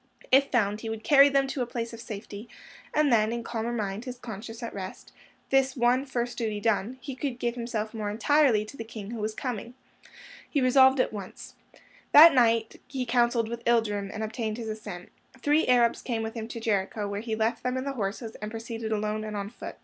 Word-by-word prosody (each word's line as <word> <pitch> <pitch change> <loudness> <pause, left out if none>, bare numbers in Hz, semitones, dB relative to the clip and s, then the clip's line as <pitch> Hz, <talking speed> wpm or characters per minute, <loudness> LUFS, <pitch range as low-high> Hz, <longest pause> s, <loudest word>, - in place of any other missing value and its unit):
If 275 +2 +5
found, 210 -3 +1
he 225 - -5
would 220 0 -5
carry 280 +3 +7
them 275 -1 +3
to 270 - -3
a 245 - -1
place 235 -1 -4
of 230 - -8
safety, 210 +1 -8 0.4
and 300 -4 +3
then, 215 -1 +3
in 235 0 -3
calmer 230 0 -3
mind, 210 -1 -3
his 250 -1 -6
conscience 225 0 -8
at 230 - -5
rest, 190 -1 -8 0.4
this 270 0 +2
one 250 +3 +2
first 245 -2 -3
duty 215 -3 -2
done, 225 +3 0
he 265 +3 -6
could 255 -1 -3
give 240 -1 -1
himself 235 -2 -4
more 215 -2 -3
entirely 235 0 +3
to 215 - -11
the 230 - -6
King 220 -2 -8
Who 235 - -5
Was 215 0 -3
Coming. 245 -1 -5 0.7
He 290 - +1
resolved 265 +1 +5
at 255 - +1
once. 200 -3 -8 0.6
That 320 +3 +10
night 230 -3 +2
he 260 -3 -3
counselled 235 -1 +2
with 235 +1 -6
Ilderim, 210 -4 +1
and 220 - -4
obtained 220 0 -3
his 230 -2 -5
assent. 210 -5 -7 0.3
Three 295 +5 +2
Arabs 240 -2 +3
came 230 -3 -2
with 220 0 -4
him 225 -2 -5
to 230 - -6
Jericho, 205 -1 -1
where 200 0 -3
he 225 -1 -3
left 225 +2 0
them 250 +1 -1
and 260 - -3
the 275 - -2
horses, 220 0 -4
and 210 - -4
proceeded 225 0 -5
alone 215 0 -1
and 215 -1 -5
on 200 +1 -4
foot. - - -8
230 Hz, 215 wpm, -27 LUFS, 215-250 Hz, 0.7 s, That